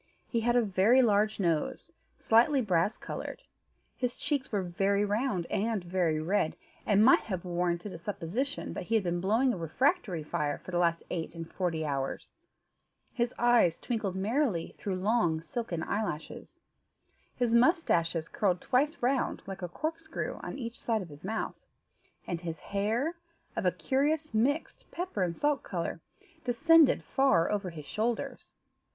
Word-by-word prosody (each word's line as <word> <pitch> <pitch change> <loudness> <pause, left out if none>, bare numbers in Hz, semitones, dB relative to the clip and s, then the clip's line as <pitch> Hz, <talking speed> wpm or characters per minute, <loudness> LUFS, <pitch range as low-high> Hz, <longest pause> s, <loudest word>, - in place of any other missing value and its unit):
He 235 - 0
had 240 +1 +2
a 245 - +5
very 215 +6 +4
large 215 -1 +2
nose, 165 -5 -1 0.3
slightly 245 +6 +4
brass 195 -4 +1
coloured; - - -6 0.5
his 250 -1 -2
cheeks 285 -3 -2
were 200 -3 0
very 195 +3 +1
round, 205 -3 0
and 215 -2 0
very 175 -3 0
red, 160 0 0 0.3
and 205 +1 +5
might 260 - +7
have 185 -4 -4
warranted 175 +2 -1
a - - -8
supposition 205 - -3
that - - -5
he 225 - 0
had 220 - +3
been 175 -1 -1
blowing 230 +7 +3
a - - -4
refractory 180 - 0
fire 150 -2 -1
for - - -10
the 175 - +1
last 170 -1 +2
eight 165 -1 -3
and 165 -1 -8
forty 165 -4 -1
hours; 135 -2 -3 0.8
his 240 -1 0
eyes 240 -8 +4
twinkled 215 -6 -2
merrily 210 - 0
through 195 -2 -3
long 185 -4 +1
silky 170 +2 -4
eyelashes, 200 -7 -4 0.8
his 240 -2 +1
moustaches 205 - +3
curled 185 -4 0
twice 285 - 0
round 260 +1 +1
like 195 -1 -7
a 180 - -4
corkscrew 315 - -4
on - - -6
each 235 -3 -6
side 220 -4 0
of 175 - -11
his 145 0 -13
mouth, 220 +4 -3 0.7
and 170 -1 -3
his 165 -2 -4
hair, 220 - -1 0.4
of 225 -5 0
a - - +4
curious 280 - 0
mixed 275 +9 0
pepper 355 - -3
and 175 -2 0
salt 290 -2 +1
colour, 170 -2 -4 0.4
descended 305 +5 +5
far 265 -11 +3
over 200 -3 -1
his 155 -4 -9
shoulders. 220 - -3
205 Hz, 160 wpm, -30 LUFS, 175-245 Hz, 0.8 s, might